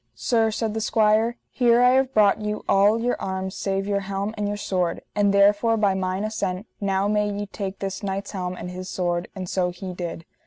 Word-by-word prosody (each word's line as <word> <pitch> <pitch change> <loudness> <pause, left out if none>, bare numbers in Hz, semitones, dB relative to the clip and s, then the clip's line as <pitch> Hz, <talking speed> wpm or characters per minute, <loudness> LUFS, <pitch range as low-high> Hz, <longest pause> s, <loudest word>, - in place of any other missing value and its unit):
Sir, 225 -2 +2
said 220 0 -2
the 220 - -2
squire, 220 +2 +2
here 240 -1 +4
I 250 - +6
have 265 0 +2
brought 215 -3 +4
you 210 0 -3
all 205 +3 +4
your 245 +2 -1
arms 190 0 -3
save 195 0 -1
your 200 0 0
helm 195 +2 -3
and 210 -1 -2
your 205 0 -2
sword, 180 -4 -1
and 205 -1 +3
therefore 205 +3 +4
by 205 -3 +3
mine 190 +1 -2
assent 200 -2 -2
now 195 -1 0
may 210 0 +1
ye 205 0 -3
take 195 -1 -5
this 195 -1 -4
knight's 195 -1 -3
helm 185 -2 -3
and 180 0 -7
his 185 +1 -7
sword: 175 -1 -1
and 185 -2 -5
so 180 0 0
he 180 +1 -7
did. 170 -2 -6
200 Hz, 210 wpm, -24 LUFS, 190-215 Hz, -, I